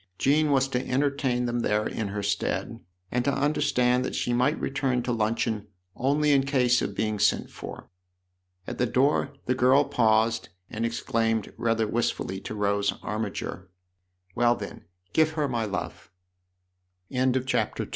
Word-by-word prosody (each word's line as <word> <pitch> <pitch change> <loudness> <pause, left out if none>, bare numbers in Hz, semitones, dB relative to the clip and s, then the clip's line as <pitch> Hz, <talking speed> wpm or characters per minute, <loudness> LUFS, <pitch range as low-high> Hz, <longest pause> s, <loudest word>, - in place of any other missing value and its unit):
Jean 150 +3 +3
was 135 -1 +3
to 125 -2 -1
entertain 130 -2 +1
them 120 0 -1
there 105 -2 +1
in 110 - -3
her 100 +1 -4
stead 100 0 -2 0.3
and 125 0 +1
to 140 - +2
understand 135 -4 +2
that - - -3
she 120 - 0
might 130 +6 +2
return 135 -3 0
to 125 - -2
luncheon 110 -1 -1 0.3
only 145 +3 +2
in 135 -1 +4
case 125 -3 +2
of 100 - -3
being 110 0 -1
sent 105 - +2
for. - - -9 0.8
At - - -6
the 125 - +2
door 135 +6 +2
the 125 - +2
girl 130 +3 +4
paused 115 -2 +2 0.2
and 115 +2 -1
exclaimed 115 -1 -1
rather 115 -1 +1
wistfully 105 -4 -1
to 110 - -7
Rose 100 -1 +1
Armiger: 105 -3 -4 0.3
" 90 0 -40
Well, 120 0 +3
then, 100 -5 -8 0.3
give 155 0 +3
her 150 -2 0
my 120 -4 -1
love! 90 -5 -5 0.5
" 90 0 -49
II 130 - -5
"YOUR 130 - +3
young 130 0 +2
friend," 125 -4 0
R - - -1
120 Hz, 170 wpm, -26 LUFS, 105-130 Hz, 0.8 s, in